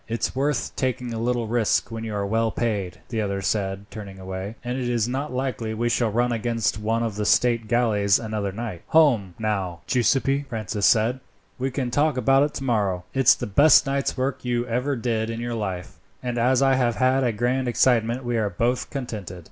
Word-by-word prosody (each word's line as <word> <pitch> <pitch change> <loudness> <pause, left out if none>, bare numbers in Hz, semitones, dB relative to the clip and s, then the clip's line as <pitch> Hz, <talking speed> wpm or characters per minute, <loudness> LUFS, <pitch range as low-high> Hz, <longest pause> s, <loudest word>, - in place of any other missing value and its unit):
"It's 115 +2 -2
worth 135 -2 -1
taking 125 -2 -2
a 115 - -3
little 120 0 0
risk 115 +1 +1
when 115 0 -5
you 110 -2 -4
are 100 -1 -1
well 115 +2 +1
paid," 105 -6 -2
the 115 -3 -1
other 100 -1 -2
said, 95 -1 -1
turning 100 -3 -8
away, 95 +3 -6
"and 125 +1 -3
it 125 -1 -2
is 120 -2 +1
not 135 +4 -3
likely 125 -4 -3
we 120 +2 0
shall 120 -1 +1
run 120 +3 +1
against 115 -2 -1
one 115 +2 0
of 110 -3 -3
the 105 - -1
state 115 +2 +2
galleys 105 -5 +3
another 110 -3 -3
night." 105 -4 -6
"Home, 120 - +3
now, 95 -6 -2
Giuseppi," 135 +3 +1
Francis 110 -3 -1
said, 120 +3 +3 0.4
"we 130 +1 0
can 130 -2 -3
talk 145 +1 +2
about 135 +3 +4
it 145 +1 0
tomorrow. 105 -9 0
It's 135 -2 +5
the - - -5
best 140 +8 +6
night's 140 -1 -1
work 130 +1 -2
you 120 -1 -1
ever 125 +4 -1
did 115 -2 -1
in 115 0 -4
your 120 0 -3
life, 95 -5 -5 0.2
and 120 -1 -2
as 125 +3 +3
I 135 0 +4
have 125 -3 +1
had 130 +3 +2
a 120 - +2
grand 125 +4 0
excitement 120 0 +2
we 120 -1 0
are 105 -2 0
both 120 +7 -1
contented." 105 -9 -6
115 Hz, 205 wpm, -24 LUFS, 105-125 Hz, 0.4 s, best